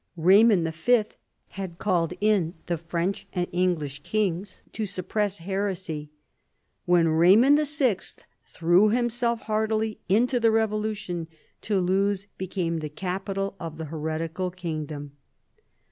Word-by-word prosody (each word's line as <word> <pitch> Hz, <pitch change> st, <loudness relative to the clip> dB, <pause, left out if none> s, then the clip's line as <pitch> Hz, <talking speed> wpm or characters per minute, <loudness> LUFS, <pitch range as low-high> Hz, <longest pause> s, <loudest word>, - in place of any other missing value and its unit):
Eaymond 185 Hz, -1 st, +5 dB
V. 215 Hz, +7 st, +1 dB, 0.4 s
had 190 Hz, -3 st, -6 dB
called 180 Hz, -3 st, 0 dB
in 200 Hz, -5 st, +2 dB
the 170 Hz, -, -1 dB
French 170 Hz, +4 st, -3 dB
and 180 Hz, -1 st, -1 dB
English 165 Hz, -6 st, -1 dB
kings 195 Hz, +1 st, -2 dB
to 215 Hz, -2 st, -3 dB
suppress 200 Hz, +2 st, -2 dB
heresy. 185 Hz, -4 st, -3 dB, 0.8 s
When 175 Hz, -1 st, +4 dB
Eaymond 200 Hz, -, +5 dB
VI. 245 Hz, -10 st, -1 dB, 0.2 s
threw 175 Hz, +5 st, +3 dB
himself 235 Hz, 0 st, 0 dB
heartily 220 Hz, 0 st, -1 dB
into 245 Hz, +6 st, +3 dB
the 230 Hz, -1 st, +4 dB
revolution, 215 Hz, -5 st, -1 dB, 0.3 s
Toulouse 195 Hz, 0 st, +1 dB
became 180 Hz, -3 st, -2 dB
the 155 Hz, -1 st, -5 dB
capital 195 Hz, +4 st, -3 dB
of 165 Hz, -2 st, -6 dB
the 160 Hz, -, -5 dB
heretical 160 Hz, +3 st, -3 dB
kingdom. 155 Hz, -5 st, -5 dB
185 Hz, 115 wpm, -26 LUFS, 165-215 Hz, 0.8 s, Eaymond